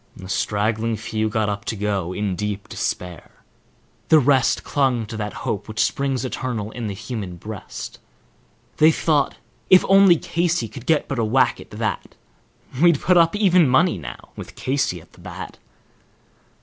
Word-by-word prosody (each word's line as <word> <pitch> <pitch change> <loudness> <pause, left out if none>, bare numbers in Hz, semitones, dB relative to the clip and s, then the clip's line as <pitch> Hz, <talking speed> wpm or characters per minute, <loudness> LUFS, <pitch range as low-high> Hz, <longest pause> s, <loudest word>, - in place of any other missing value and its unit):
A 95 - -9
straggling 110 +3 -1
few 110 0 -2
got 110 0 0
up 100 -1 -3
to - - -2
go, 100 -4 -2
in 100 0 -2
deep 105 0 -4
despair. 90 -3 -4 0.8
The 160 - +7
rest 135 -3 +3
Clung 130 -5 +1
to 110 +2 -8
that 105 -1 -3
hope 100 - -2
which 110 0 -6
"springs 135 -2 -1
eternal 120 -5 -4
in 120 -2 -5
the 100 - -4
human 110 -4 -6
breast;" 105 +4 -8 0.8
They 155 +1 +6
thought, 150 -3 +1 0.3
If 185 - +7
only 195 -2 +7
Casey 170 -6 -1
could 130 +3 -11
but 160 -2 +2
get 135 -4 -3
a - - +2
whack 120 +5 +2
at - - -14
that, - - -4 0.7
We'd 170 -4 +5
put 180 - +2
up 165 +2 +4
even 180 -7 +4
money 130 - +3
now, 65 -6 -9
with - - -9
Casey 130 -9 -1
at - - -20
the - - -18
bat. - - -8
115 Hz, 165 wpm, -22 LUFS, 105-145 Hz, 0.8 s, The